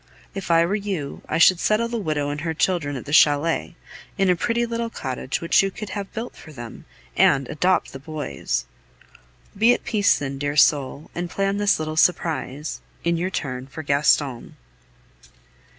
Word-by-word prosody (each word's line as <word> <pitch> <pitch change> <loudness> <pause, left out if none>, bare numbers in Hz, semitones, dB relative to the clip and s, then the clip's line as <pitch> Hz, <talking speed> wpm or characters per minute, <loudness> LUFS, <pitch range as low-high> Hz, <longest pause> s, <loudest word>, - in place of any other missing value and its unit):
If 195 -3 -6
I 165 0 +5
were 180 - -1
you, 195 -9 -3
I - - 0
should 175 +1 +6
settle 215 +4 +1
the 235 0 -3
widow 150 -6 -1
and 145 0 -4
her 160 0 -2
children 160 -4 0
at 130 - -6
the 145 - -6
chalet, 155 +3 +3 0.4
in 195 -2 +3
a - - +3
pretty 235 +6 0
little 230 0 -3
cottage 130 - -4
which 170 - +4
you 195 - 0
could 210 +2 -8
have 200 -2 -5
built 230 +2 -6
for 155 - -13
them, 120 -5 -10 0.3
and 135 -2 +4
adopt 180 +4 +1
the 135 - -7
boys! 145 - -3 0.9
Be 230 +4 +5
at - - -9
peace, 215 -4 +3
then, 135 -1 -5
dear 145 +1 -2
soul, 145 -1 +2
and 175 0 -4
plan 195 +2 -1
this 205 0 +3
little 155 0 -4
surprise, 155 -4 0 0.2
in 170 0 +1
your 175 +3 -1
turn, 130 -7 -4
for 155 +3 -8
Gaston. 140 -3 +1
165 Hz, 180 wpm, -23 LUFS, 145-195 Hz, 0.9 s, should